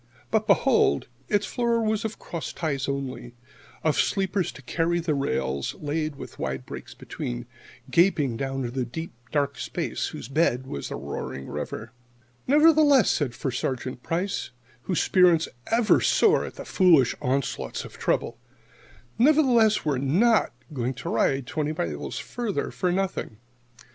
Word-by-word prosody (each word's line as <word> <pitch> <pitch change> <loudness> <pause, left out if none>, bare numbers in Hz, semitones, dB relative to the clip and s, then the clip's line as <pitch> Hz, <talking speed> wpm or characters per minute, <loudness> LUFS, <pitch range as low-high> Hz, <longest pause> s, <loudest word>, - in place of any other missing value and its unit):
But 220 -1 +1
behold, 200 - +3 0.2
its 205 -1 +2
floor 235 -2 0
was 220 0 0
of 220 -1 -4
cross 170 -2 -6
ties 140 -6 -2
only 130 -3 -4 0.5
of 155 -2 +2
sleepers 190 -2 +1
to 135 - -13
carry 170 +6 0
the 165 -2 0
rails, 70 - -1
laid 155 0 -2
with - - -10
wide - - -3
breaks - - -9
between, - - -5 0.5
gaping 160 -8 +3
down 135 +1 -3
into 125 +2 -2
deep, 160 +8 -6 0.2
dark 140 -2 0
space - - -3
whose - - -7
bed 135 -3 +1
was 70 - -5
the - - -4
roaring 65 - -5
river. 110 +1 -5 0.6
"Nevertheless," 295 - +6
said 140 -6 -1
First 130 -3 -2
Sergeant 130 -1 -3
Price, 180 +7 -2 0.4
whose 180 - 0
spirits 175 -4 +4 0.2
ever 225 -1 +3
soar 445 0 +4
at - - -9
the - - -8
foolish 165 - +4
onslaughts 130 +1 -2
of - - -12
trouble 115 0 0 0.8
"nevertheless, 245 - +4
we're 140 -4 +1
not 195 - +3 0.2
going 125 -1 -2
to 125 - -5
ride 135 +3 +1
twenty 155 +1 -2
miles 75 - -4
farther 235 -5 -3
for 180 - 0
nothing. 185 - -2
155 Hz, 145 wpm, -26 LUFS, 130-205 Hz, 0.8 s, Nevertheless